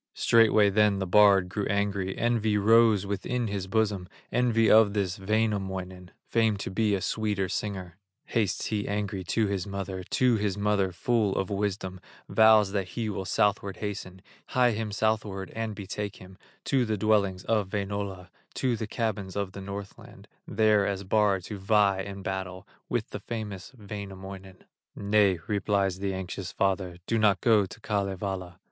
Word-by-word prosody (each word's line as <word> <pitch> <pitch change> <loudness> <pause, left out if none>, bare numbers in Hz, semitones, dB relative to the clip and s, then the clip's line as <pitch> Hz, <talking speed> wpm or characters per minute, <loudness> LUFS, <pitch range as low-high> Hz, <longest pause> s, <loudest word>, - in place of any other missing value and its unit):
Straightway 110 -3 +4
then 105 0 +3
the 95 - -2
bard 100 0 +5
grew 100 +2 -3
angry, 100 -2 -1
Envy 115 -3 +1
rose 110 -1 +5
within 100 +5 -2
his 100 -3 -3
bosom, 100 -3 0 0.2
Envy 115 -2 +2
of 110 -2 +6
this 95 -2 -1
Wainamoinen, 95 -3 -2 0.2
Famed 110 -3 +1
to - - -4
be 105 +1 +1
a 95 - -3
sweeter 105 -3 -1
singer; 95 -3 -4 0.3
Hastes 110 -4 -1
he 105 -2 -2
angry 100 -2 -2
to 110 +5 +1
his 100 -2 -2
mother, 100 -1 -5
To 125 +5 +2
his 100 -2 -1
mother, 100 -2 +1
full 105 +2 0
of 95 +1 -2
wisdom, 95 -2 -2 0.3
Vows 110 -2 +5
that 100 -2 -1
he 110 +4 -3
will 95 -1 -4
southward 100 0 0
hasten, 95 -3 -6 0.2
Hie 125 -2 +3
him 110 -1 -3
southward 105 -2 -1
and 115 -1 -3
betake 100 0 -5
him 95 0 -13 0.3
To 135 -2 +2
the 110 -2 -1
dwellings 100 -3 +1
of 105 -4 0
Wainola, 100 -2 -4 0.3
To 125 -3 0
the 110 -1 -4
cabins 105 -5 -3
of 100 -2 -2
the 100 - -8
Northland, 100 0 -9 0.2
There 105 -1 +3
as 100 -1 -2
bard 100 -1 +2
to 100 +2 -7
vie 100 -1 +3
in 100 0 -7
battle, 95 0 -5 0.2
With 120 -3 -2
the - - -5
famous 105 -4 -6
Wainamoinen. 95 -2 -9 0.3
"Nay," 100 -2 +3
replies 100 -2 0
the 100 -1 -2
anxious 95 0 -5
father, 95 -2 -1
"Do 115 +2 0
not 105 -2 +3
go 110 -5 +3
to 110 - -12
Kalevala." 95 -4 -3
100 Hz, 160 wpm, -27 LUFS, 95-110 Hz, 0.3 s, of